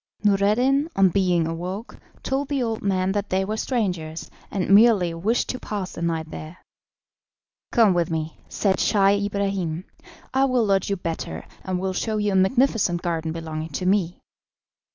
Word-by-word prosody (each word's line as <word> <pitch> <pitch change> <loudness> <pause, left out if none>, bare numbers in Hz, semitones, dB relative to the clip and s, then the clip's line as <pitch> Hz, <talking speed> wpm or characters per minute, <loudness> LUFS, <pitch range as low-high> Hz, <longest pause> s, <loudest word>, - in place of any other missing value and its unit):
Noureddin, 220 +9 +3
on 195 -1 +5
being 180 -2 +2
awoke, 180 +7 -5 0.2
told 270 +1 -1
the 275 -3 0
old 225 -2 -2
man 190 -1 +1
that 205 +1 -2
they 190 +1 +1
were 215 +2 -2
strangers, 180 -10 -2 0.2
and 195 -1 -2
merely 205 -5 +5
wished 205 +9 0
to 255 - -3
pass 200 -3 -4
the - - -8
night 165 -2 -2
there. 155 +3 -8 1.1
"Come 220 -5 +5
with 175 -2 +1
me," 160 -1 -3
said 190 -3 +1
Scheih 200 -1 +3
Ibrahim, 195 -4 -2 0.5
"I 265 +1 +4
will 255 -4 +2
lodge 195 -2 +1
you 200 - +1
better, 165 - -5 0.2
and 185 -1 -2
will 190 0 -2
show 215 +3 -1
you 210 -1 0
a - - 0
magnificent 190 -3 +2
garden 165 -2 -1
belonging 160 -1 -5
to 180 - -3
me." 185 -2 +1
190 Hz, 165 wpm, -24 LUFS, 170-215 Hz, 1.1 s, on